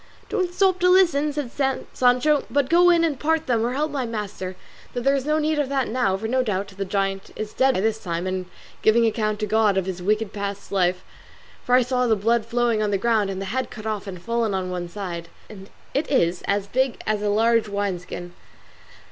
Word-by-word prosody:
"Don't 365 Hz, -2 st, 0 dB
stop 375 Hz, 0 st, +2 dB
to 360 Hz, -, +4 dB
listen," 335 Hz, -6 st, +4 dB
said 285 Hz, -4 st, -4 dB, 0.4 s
Sancho, 255 Hz, +4 st, +3 dB
"but 285 Hz, 0 st, 0 dB
go 350 Hz, +1 st, +6 dB
in 340 Hz, -1 st, +4 dB
and 300 Hz, -6 st, 0 dB
part 320 Hz, +2 st, +1 dB
them 235 Hz, -3 st, +1 dB
or 240 Hz, +2 st, -1 dB
help 300 Hz, +3 st, -1 dB
my 275 Hz, -2 st, -2 dB
master: 210 Hz, -5 st, -5 dB, 0.4 s
though 245 Hz, -, -2 dB
there 275 Hz, +3 st, +2 dB
is 275 Hz, 0 st, -1 dB
no 305 Hz, 0 st, +2 dB
need 310 Hz, 0 st, 0 dB
of 285 Hz, -2 st, 0 dB
that 270 Hz, -2 st, 0 dB
now, 220 Hz, -5 st, +1 dB
for 220 Hz, +3 st, -4 dB
no 255 Hz, +3 st, +2 dB
doubt 200 Hz, -4 st, -2 dB
the 195 Hz, 0 st, -5 dB
giant 195 Hz, 0 st, -2 dB
is 215 Hz, -1 st, -5 dB
dead 265 Hz, 0 st, +3 dB
by -, -, 0 dB
this 220 Hz, +1 st, -1 dB
time 170 Hz, 0 st, -3 dB
and 185 Hz, -1 st, -3 dB, 0.3 s
giving 230 Hz, +2 st, +4 dB
account 215 Hz, -1 st, 0 dB
to -, -, +1 dB
God 210 Hz, -2 st, +2 dB
of 190 Hz, -, +1 dB
his 185 Hz, -2 st, -4 dB
past 180 Hz, +1 st, -8 dB
wicked 215 Hz, 0 st, +1 dB, 0.4 s
life; 180 Hz, -1 st, +1 dB, 0.6 s
for 250 Hz, -, +3 dB
I 250 Hz, -, +5 dB
saw 250 Hz, 0 st, 0 dB
the 225 Hz, -, +4 dB
blood 225 Hz, +2 st, +1 dB
flowing 235 Hz, -2 st, +1 dB
on 210 Hz, -, +1 dB
the 200 Hz, -, +1 dB
ground, 215 Hz, -1 st, +1 dB
and 190 Hz, -1 st, -4 dB
the 195 Hz, -, -4 dB
head 260 Hz, 0 st, -1 dB
cut 215 Hz, -2 st, -10 dB
off 215 Hz, -2 st, -3 dB
and 185 Hz, -2 st, -6 dB
fallen 230 Hz, +1 st, -1 dB
on 185 Hz, -1 st, -2 dB
one 175 Hz, -1 st, -4 dB
side, 170 Hz, -3 st, -6 dB, 0.2 s
and 195 Hz, -2 st, -12 dB, 0.2 s
it 285 Hz, +3 st, -1 dB
is 175 Hz, -10 st, +2 dB
as 200 Hz, 0 st, +1 dB
big 260 Hz, +4 st, 0 dB
as 215 Hz, -1 st, 0 dB
a 210 Hz, -, 0 dB
large 225 Hz, +1 st, +2 dB
wine 200 Hz, -3 st, -1 dB
skin." 175 Hz, 0 st, -8 dB
220 Hz, 230 wpm, -23 LUFS, 195-260 Hz, 0.6 s, go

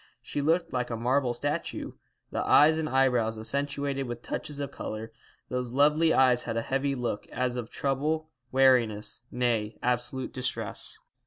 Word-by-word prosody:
She 145 Hz, -, -3 dB
looked 165 Hz, +3 st, +1 dB
like 125 Hz, -1 st, -1 dB
a 115 Hz, -, -3 dB
marble 125 Hz, +2 st, +1 dB
statue, 145 Hz, +4 st, -3 dB, 0.4 s
the -, -, -1 dB
eyes 155 Hz, +2 st, +6 dB
and 155 Hz, -1 st, -1 dB
eyebrows 125 Hz, -4 st, +2 dB
accentuated 140 Hz, +3 st, -2 dB
with 120 Hz, 0 st, -6 dB
touches 145 Hz, -1 st, -4 dB
of 140 Hz, -1 st, -3 dB
colour. 110 Hz, -2 st, -6 dB, 0.4 s
Those 125 Hz, -1 st, -3 dB
lovely 150 Hz, +4 st, +4 dB
eyes 125 Hz, -3 st, +4 dB
had 115 Hz, -1 st, -2 dB
a 115 Hz, -, 0 dB
heavy 135 Hz, +2 st, 0 dB
look, 120 Hz, -5 st, -3 dB
as 125 Hz, 0 st, -1 dB
of 120 Hz, -3 st, -4 dB
trouble, 155 Hz, +3 st, -1 dB, 0.2 s
weariness; 120 Hz, -6 st, +3 dB
nay, 115 Hz, -3 st, 0 dB
absolute 125 Hz, +1 st, -1 dB
distress. 130 Hz, 0 st, -1 dB
130 Hz, 155 wpm, -28 LUFS, 120-140 Hz, 0.4 s, eyes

